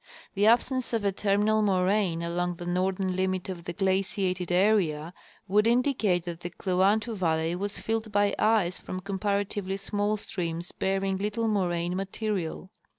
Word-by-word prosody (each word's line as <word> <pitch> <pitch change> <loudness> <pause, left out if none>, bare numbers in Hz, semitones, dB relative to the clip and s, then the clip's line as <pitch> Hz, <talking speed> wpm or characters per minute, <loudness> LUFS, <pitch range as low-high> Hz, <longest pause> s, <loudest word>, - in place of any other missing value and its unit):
The 205 +1 +3
absence 245 +2 +2
of 225 -3 0
a 200 - +3
terminal 205 +2 +2
moraine 185 -3 +1
along 175 +1 -1
the 175 - -8
northern 185 +1 0
limit 185 0 -1
of 175 -3 -6
the 175 - -4
glaciated 190 -2 0
area 175 -5 +2 0.3
would 210 +3 +3
indicate 230 -8 +2
that 170 -1 -5
the 175 - -5
Kluantu 200 +6 +1
valley 165 -2 0
was 200 +3 -4
filled 220 -1 -2
by 205 -1 +2
ice 210 -5 +2
from 185 - -6
comparatively 200 0 -2
small 205 +1 -1
streams 170 -3 -4
bearing 195 0 -1
little 210 +3 -1
moraine 175 -4 0
material. 195 -2 -3
195 Hz, 150 wpm, -28 LUFS, 180-210 Hz, 0.3 s, The